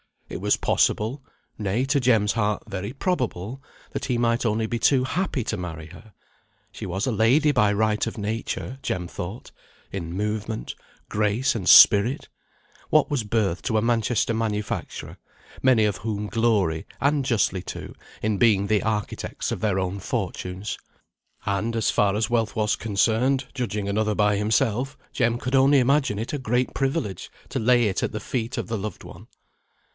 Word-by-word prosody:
It - - -6
was - - +2
possible, 115 +7 +1 0.4
nay, 105 +5 0
to 140 +1 +2
Jem's 115 -5 +3
heart, 105 -2 0
very 100 +2 -5
probable, 130 - -2 0.3
that - - -4
he 125 -3 0
might 120 0 +1
only 110 0 +1
be 120 +1 -2
too 130 0 +3
happy 160 -2 -1
to - - -3
marry 80 -3 -6
her. 95 +6 -15 0.6
She - - -7
was 95 +3 -2
a 130 - 0
lady 125 +8 +4
by 105 -6 +3
right 105 +1 +1
of 115 - -5
nature, 110 +4 -4
Jem 90 -1 -3
thought; 95 +7 -7 0.4
in 85 -3 -5
movement, 105 +3 -3 0.4
grace, 105 +5 +1
and 95 -6 -4
spirit. 110 +7 +7 0.6
what 155 0 +3
was 140 -6 0
birth 105 -5 0
to 110 -4 0
a - - +3
Manchester 115 0 +1
manufacturer, 105 -2 -3 0.4
many 130 -4 +4
of 105 -3 +1
whom 105 -1 -3
glory, 105 -9 +1
and 140 0 +2
justly 100 -6 +1
too, - - -7 0.3
in 105 -1 +1
being 100 -2 +3
the 105 -1 +2
architects 105 -2 -3
of - - -2
their 105 -3 0
own 95 +1 -2
fortunes? 95 -1 -4 0.7
And, 105 +4 -1
as 115 - +1
far 100 -1 +2
as 110 0 0
wealth 115 -3 0
was 105 -1 +1
concerned, 115 +5 +1
judging 110 -6 -3
another 105 +1 0
by 105 -1 +2
himself, 115 +5 0
Jem 120 -2 +1
could 125 +2 -4
only 135 +1 +5
imagine 135 -3 +2
it 115 +6 -4
a 145 - -1
great 125 0 0
privilege 135 - -2 0.2
to 135 - -2
lay 120 +1 +4
it 95 - -1
at - - -2
the 105 - -4
feet 115 +1 -3
of - - -3
the 115 -1 -2
loved 105 -1 -6
one. - - -12
110 Hz, 170 wpm, -24 LUFS, 105-125 Hz, 0.7 s, spirit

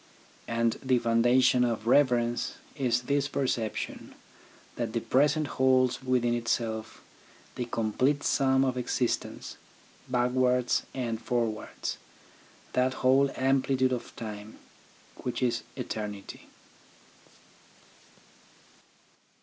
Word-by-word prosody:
And 115 0 0
the 130 -1 +2
foundation 120 +2 +4
of 115 -3 -1
reverence 120 -2 +2 0.2
is 125 -3 0
this 140 +2 +1
perception, 125 -6 -3 0.6
that 115 -2 -3
the 115 - +1
present 145 +7 +2
holds 130 -2 +2
within 125 -2 +1
itself 115 -2 -2 0.5
the 125 - -3
complete 120 +5 0
sum 135 -1 +3
of 130 -1 -1
existence, 125 0 -2 0.5
backwards 125 0 +1
and 120 -3 -2
forwards, 115 -3 -2 0.7
that 130 +1 +1
whole 135 +2 +5
amplitude 130 -1 +2
of 125 - -5
time, 105 -1 -7 0.6
which 125 +1 -3
is 120 -1 +1
eternity. 105 -5 -6
125 Hz, 95 wpm, -28 LUFS, 115-130 Hz, 0.7 s, whole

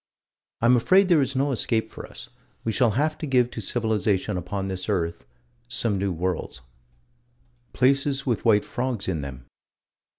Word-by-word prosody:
I'm 120 +2 +5
afraid 185 +10 +4
there 165 -5 +5
is 135 0 0
no 140 +2 +1
escape 110 -2 -1
for - - -8
us: - - -10 0.3
we 115 - 0
shall 120 +2 +3
have 155 +2 0
to 155 - -4
give 125 -2 +2
to 115 - -5
civilization 105 -3 0
upon 95 +2 -3
this 95 +1 -4
earth 85 -9 -1 0.4
some 115 -4 -1
new 100 0 0
worlds. 90 -6 -3 1.1
Places 135 +1 +2
with 120 -5 -1
white 105 -3 +4
frogs 125 -4 -3
in 85 -5 -1
them. 65 -2 -8
115 Hz, 160 wpm, -25 LUFS, 95-130 Hz, 1.1 s, I'm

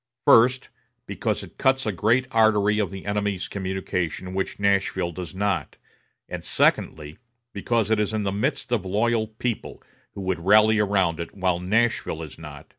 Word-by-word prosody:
First, 125 +3 +5 0.4
because - - -2
it - - -14
cuts 130 0 +2
a 110 - 0
great 115 +7 +2
artery 105 -2 +3
of 100 -4 0
the 95 -1 -9
enemy's 100 -2 -2
communication 95 -2 -3
which 95 +1 -3
Nashville 95 -3 +1
does 90 0 -8
not; 100 0 -1 0.5
and, - - -6
secondly, 75 -1 0 0.3
because 110 +1 0
it 110 - +3
is 105 0 0
in 110 -1 -2
the 100 - -1
midst 105 +4 -2
of 115 -6 +1
loyal 110 +4 0
people, 110 +1 -5 0.3
who 100 - -6
would 95 -2 -2
rally 110 +3 +5
around 95 -5 +1
it, 85 - -6
while 95 -3 0
Nashville 105 -3 0
is 80 - -11
not.... 75 -2 -10
100 Hz, 165 wpm, -24 LUFS, 95-110 Hz, 0.5 s, First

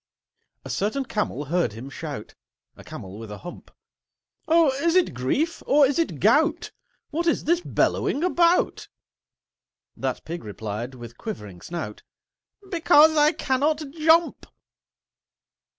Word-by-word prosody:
A - - -7
certain 220 +7 -1
Camel 175 - -2
heard 165 -6 0
him 115 +5 -8
shout— 145 -5 -7 0.4
A - - -14
Camel 95 +2 -9
with 115 -1 -9
a 105 - -7
hump. 175 - -10 0.8
"Oh, 325 -3 +5
is 335 +1 +2
it 365 - +3
Grief, 270 - -1
or 290 0 +6
is 275 +4 0
it 330 - -1
Gout? - - +2 0.4
What 335 +3 -1
is 330 - +1
this 340 +2 +2
bellowing 305 -3 0
about?" 345 -1 +2 1.1
That - - -4
Pig 170 +2 -6
replied, 110 +4 -6
with 120 -1 -11
quivering 105 - -7
snout, 160 -12 -6 0.7
"Because 315 -2 +5
I 300 0 +5
cannot 295 0 -1
jump!" 325 +2 +2
260 Hz, 130 wpm, -24 LUFS, -, 1.1 s, or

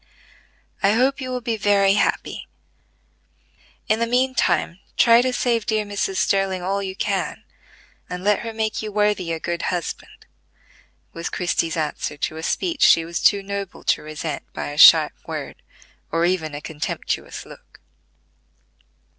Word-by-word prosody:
"I 200 +1 +4
hope 265 +4 +2
you 255 - -4
will 250 -1 -3
be 230 -1 -2
very 200 -2 +3
happy. 210 - -1 1.4
In 215 +1 +2
the 235 - +1
mean 255 +2 +1
time 180 -7 0 0.2
try 235 0 +6
to 255 +1 0
save 235 -3 0
dear 215 -1 0
Mrs. 200 -1 -2
Sterling 190 -1 +1
all 195 +2 -1
you 190 -1 -5
can, - - -2 0.7
and 180 0 -5
let 210 +1 +3
her 230 - -5
make 220 -1 -2
you 215 -1 -5
worthy 210 -4 +1
a 165 - -2
good 170 +1 -3
husband," 180 -2 -5 0.9
was 165 0 -4
Christie's 170 -2 -1
answer 150 -1 -3
to 155 +2 -3
a - - -5
speech 335 - -2
she 165 - +6
was 170 0 -4
too 200 -1 +4
noble 200 -1 -6
to - - +1
resent 155 -1 -5
by - - -4
a 145 - -8
sharp - - +8
word, - - -6 0.5
or 165 +1 +2
even 165 -4 -1
a 145 - -6
contemptuous 150 0 -4
look. - - -16
195 Hz, 155 wpm, -22 LUFS, 170-220 Hz, 1.4 s, sharp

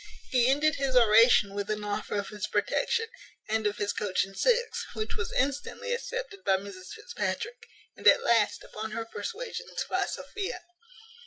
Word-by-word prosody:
He 250 -2 +4
ended 295 +3 +3
his 275 -2 -1
oration 225 -3 +6
with 205 +1 -3
an 210 0 -2
offer 205 0 -3
of 200 - -3
his 210 -1 -4
protection, 480 -2 +1 0.4
and 220 0 +1
of 210 - -2
his 205 0 -1
coach 190 -3 0
and 195 0 -14
six, 485 - +1
which 215 0 -3
was 205 - -3
instantly 285 - -1
accepted 480 -4 -5
by 190 - +3
Mrs 190 -1 -9
Fitzpatrick, 450 - -4 0.3
and - - -1
at - - +7
last, 230 -3 +2
upon 215 0 -6
her 225 0 -3
persuasions, 400 - -5
by - - 0
Sophia. 385 -4 -5
230 Hz, 165 wpm, -29 LUFS, -, 0.4 s, at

